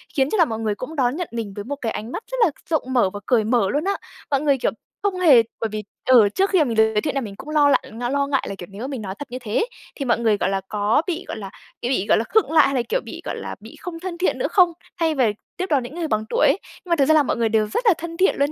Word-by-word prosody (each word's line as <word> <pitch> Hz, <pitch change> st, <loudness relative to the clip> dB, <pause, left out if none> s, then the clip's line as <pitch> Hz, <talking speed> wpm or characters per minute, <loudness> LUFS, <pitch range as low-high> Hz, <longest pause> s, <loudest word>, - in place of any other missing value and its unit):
khiến 270 Hz, -2 st, +2 dB
cho 435 Hz, -, 0 dB
là 340 Hz, -, +6 dB
mọi 225 Hz, -6 st, -4 dB
người 215 Hz, -2 st, -1 dB
cũng 255 Hz, +9 st, -7 dB
đón 255 Hz, -2 st, +1 dB
nhận 350 Hz, 0 st, -3 dB
mình 225 Hz, -4 st, -4 dB
với 205 Hz, -, -5 dB
một 280 Hz, +7 st, -4 dB
cái 225 Hz, -, -1 dB
ánh 220 Hz, +3 st, -5 dB
mắt 445 Hz, -, -5 dB
rất -, -, -2 dB
là 330 Hz, -, +1 dB, 0.2 s
rộng 315 Hz, -2 st, +1 dB
mở 240 Hz, -7 st, +3 dB
và 205 Hz, -, -5 dB
cởi 240 Hz, -4 st, +3 dB
mở 220 Hz, -3 st, +2 dB
luôn 290 Hz, +8 st, 0 dB
á. 400 Hz, -, +2 dB, 0.4 s
Mọi 275 Hz, -, +2 dB
người, 285 Hz, -2 st, +3 dB
kiểu, 245 Hz, -, 0 dB, 0.3 s
không 395 Hz, -3 st, 0 dB
hề 285 Hz, -10 st, +7 dB, 0.2 s
bởi 225 Hz, -, 0 dB
vì 215 Hz, 0 st, -4 dB, 0.2 s
ừ, 245 Hz, -5 st, +7 dB
trước 390 Hz, +1 st, +2 dB
khi 365 Hz, -5 st, +4 dB
mình 240 Hz, -5 st, -2 dB
được 220 Hz, 0 st, +4 dB
giới 210 Hz, -, +2 dB
thiệu 295 Hz, -, -2 dB
là 275 Hz, -, +1 dB
mình 205 Hz, -5 st, -7 dB
cũng 285 Hz, -, -10 dB
lo 300 Hz, -2 st, +4 dB
lại -, -, +1 dB, 0.2 s
lo 280 Hz, 0 st, +1 dB
ngại 275 Hz, -2 st, 0 dB
là, 195 Hz, -, -4 dB
kiểu, 175 Hz, -, -9 dB
nếu 220 Hz, +7 st, -6 dB
mình 270 Hz, -5 st, -5 dB
nói 190 Hz, -2 st, -5 dB
thật 285 Hz, -4 st, -8 dB
như 255 Hz, -, -4 dB
thế, 230 Hz, -, 0 dB, 0.3 s
thì 275 Hz, -, -4 dB
mọi 235 Hz, -, +2 dB
người, 220 Hz, -3 st, +2 dB
gọi 190 Hz, -, 0 dB
là, 195 Hz, 0 st, -1 dB
có 210 Hz, +5 st, +2 dB
bị, 355 Hz, 0 st, -3 dB
gọi -, -, -5 dB
là, 195 Hz, -2 st, -6 dB, 0.3 s
kiểu, 240 Hz, -, -2 dB
bị, 205 Hz, -7 st, +1 dB
gọi -, -, +5 dB
là, 225 Hz, -, +1 dB
khựng 435 Hz, -, +1 dB
lại 315 Hz, -2 st, +6 dB
hay 275 Hz, -, 0 dB
là, 250 Hz, -, +2 dB
kiểu, -, -, +1 dB
bị, -, -, -8 dB
gọi -, -, -3 dB
là, -, -, -6 dB
bị -, -, -13 dB
không 340 Hz, -2 st, -6 dB
thân 355 Hz, 0 st, -5 dB
thiện 365 Hz, -, +1 dB
nữa -, -, 0 dB
không? 360 Hz, -3 st, +5 dB, 0.3 s
Thay 325 Hz, -2 st, +1 dB
về 240 Hz, -6 st, +2 dB, 0.2 s
tiếp 370 Hz, -, -1 dB
đón 280 Hz, -5 st, +2 dB
những 245 Hz, +6 st, -8 dB
người 340 Hz, -2 st, -2 dB
bằng 215 Hz, -6 st, 0 dB
tuổi -, -, +3 dB
ấy. -, -, +3 dB, 0.3 s
Nhưng -, -, -13 dB
mà 340 Hz, -, +4 dB
thực 280 Hz, -4 st, +3 dB
ra 315 Hz, -, +4 dB
là 305 Hz, -1 st, +5 dB
mọi 255 Hz, -, -1 dB
người 230 Hz, -1 st, +1 dB
đều 215 Hz, -1 st, +2 dB
rất 475 Hz, -, -2 dB
là 425 Hz, -, +7 dB
thân 335 Hz, 0 st, -7 dB
thiện 380 Hz, -, +3 dB
luôn 280 Hz, +1 st, +1 dB
270 Hz, 325 wpm, -22 LUFS, 220-320 Hz, 0.4 s, hề